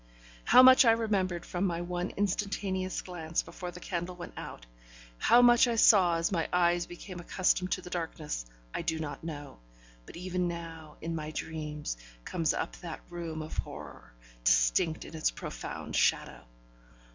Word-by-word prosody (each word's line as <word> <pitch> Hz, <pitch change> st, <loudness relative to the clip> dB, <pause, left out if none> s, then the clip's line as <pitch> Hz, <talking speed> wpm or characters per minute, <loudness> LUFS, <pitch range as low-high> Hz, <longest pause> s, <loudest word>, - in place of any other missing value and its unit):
How 255 Hz, -, +8 dB
much 260 Hz, +2 st, +9 dB
I 230 Hz, -2 st, +6 dB
remembered 195 Hz, -6 st, 0 dB
from 180 Hz, +2 st, -1 dB
my 170 Hz, -1 st, -2 dB
one 175 Hz, +1 st, -3 dB
instantaneous 195 Hz, -1 st, -1 dB
glance 165 Hz, -3 st, -3 dB
before 180 Hz, -, -7 dB
the 175 Hz, -, -9 dB
candle 180 Hz, 0 st, -4 dB
went 175 Hz, -, -9 dB
out, -, -, -8 dB, 0.5 s
how 240 Hz, +1 st, +6 dB
much 240 Hz, 0 st, +7 dB
I 235 Hz, -, 0 dB
saw 190 Hz, -6 st, +6 dB
as 165 Hz, +3 st, 0 dB
my 165 Hz, -4 st, 0 dB
eyes 175 Hz, -1 st, +2 dB
became 175 Hz, +1 st, -9 dB
accustomed 185 Hz, +1 st, 0 dB
to 185 Hz, -, -4 dB
the 180 Hz, -, -10 dB
darkness, 155 Hz, -, -4 dB, 0.3 s
I -, -, -2 dB
do 160 Hz, -, -1 dB
not 155 Hz, -1 st, -5 dB
know, 145 Hz, -, -7 dB, 0.5 s
but -, -, -10 dB
even 180 Hz, 0 st, -1 dB
now, 165 Hz, -3 st, -7 dB
in 165 Hz, +1 st, -3 dB
my 155 Hz, -2 st, -4 dB
dreams, 150 Hz, -, -5 dB, 0.3 s
comes 165 Hz, -2 st, 0 dB
up -, -, -3 dB
that 170 Hz, -2 st, -7 dB
room 165 Hz, -2 st, -5 dB
of 155 Hz, -, -8 dB
horror, -, -, -8 dB, 0.3 s
distinct -, -, +3 dB
in -, -, -10 dB
its 155 Hz, -, +1 dB
profound -, -, -6 dB
shadow. -, -, +1 dB
175 Hz, 165 wpm, -30 LUFS, 160-185 Hz, 0.5 s, much